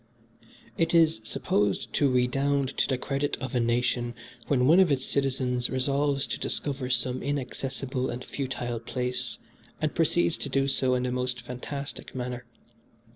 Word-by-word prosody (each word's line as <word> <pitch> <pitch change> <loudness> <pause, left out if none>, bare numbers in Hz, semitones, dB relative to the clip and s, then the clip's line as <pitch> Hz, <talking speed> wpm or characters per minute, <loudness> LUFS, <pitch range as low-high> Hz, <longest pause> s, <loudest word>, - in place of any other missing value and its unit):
"It 165 0 +2
is 160 -8 +5
supposed 105 -2 0
to 145 - +3
redound 135 +2 +2
to - - +3
the 130 - +1
credit 140 +3 -1
of 130 -2 -5
a 125 - +2
nation 120 0 +1 0.3
when 125 -3 +3
one 165 +7 +7
of 185 -5 +5
its 135 -1 +1
citizens 130 -3 0
resolves 140 +1 +1
to - - -4
discover 135 -3 -2
some 125 0 +1
inaccessible 135 -1 -2
and 125 +1 -5
futile 125 -4 -3
place, 125 -1 -3 0.4
and 155 -1 0
proceeds 170 0 +2
to 140 - -4
do 135 0 +2
so 130 -2 +2
in 125 - 0
the 125 - -1
most 125 0 -1
fantastic 130 +4 -6
manner. 125 -1 -4
130 Hz, 155 wpm, -28 LUFS, 125-140 Hz, 0.4 s, one